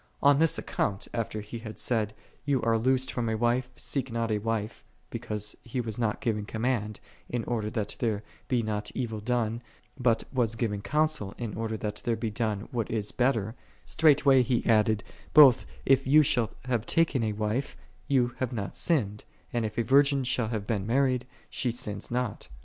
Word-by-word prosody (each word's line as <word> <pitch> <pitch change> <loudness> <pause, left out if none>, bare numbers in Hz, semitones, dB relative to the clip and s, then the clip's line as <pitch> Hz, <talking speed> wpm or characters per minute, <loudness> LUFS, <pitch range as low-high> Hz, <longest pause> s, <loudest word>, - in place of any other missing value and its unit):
On 140 0 +6
Ihis 165 0 +3
account, 100 -1 -2
after 110 -2 -3
he 105 +3 -7
had 110 -1 -8
said, 110 -3 0 0.3
"Thou 140 -2 +2
art 115 -1 +2
loosed 130 +1 +2
from 120 -2 -1
a 110 - 0
wife, 120 +2 +1
seek 135 -3 -3
nol 115 -1 -1
a 105 - +1
wife; 110 0 -3
" - - -38
because 105 -3 -2
he 125 +1 -4
was 115 -2 -3
nol 110 -3 +1
giv 110 -3 0
ing 105 - -5
command, 110 -2 -1 0.3
in 120 -2 -2
order 110 -3 -2
that 110 -3 -3
there 110 -3 -1 0.2
be 125 -3 +1
not 105 -1 -2
evil 115 -4 -3
done, 115 0 -1 0.4
but 120 -2 +2
was 115 -4 +1
giving 105 -4 -2
counsel, 150 -3 0
in 115 -4 -4
order 110 0 -3
that 105 -1 -4
there 115 - +1
be 115 -1 -3
done 105 -2 -2
what 120 -4 -2
is 105 -2 -2
betler: 115 -4 +1 0.3
straightway 140 -4 +5
he 125 -1 0
added, 110 -2 +3 0.2
" - - -24
Both, 140 -6 +8 0.2
if 135 0 +4
thou 150 +4 +6
shall 120 -5 +1 0.2
have 120 -3 -1
taken 160 -6 +3
a 110 -1 0
wife, 110 +6 -2 0.3
thou 125 -3 +3
hast 130 -1 -2
not 100 -4 -4
sinned; 110 - 0 0.3
and, 120 -1 0
if 110 0 -5
a 120 - +2
virgin 140 +2 +4
shall 125 -2 0
have 110 -3 -3
been 105 -3 -2
married, 130 0 +1 0.2
she 125 - -2
sinneth 105 -4 -4
not. 125 -2 -2
115 Hz, 195 wpm, -28 LUFS, 110-130 Hz, 0.4 s, Both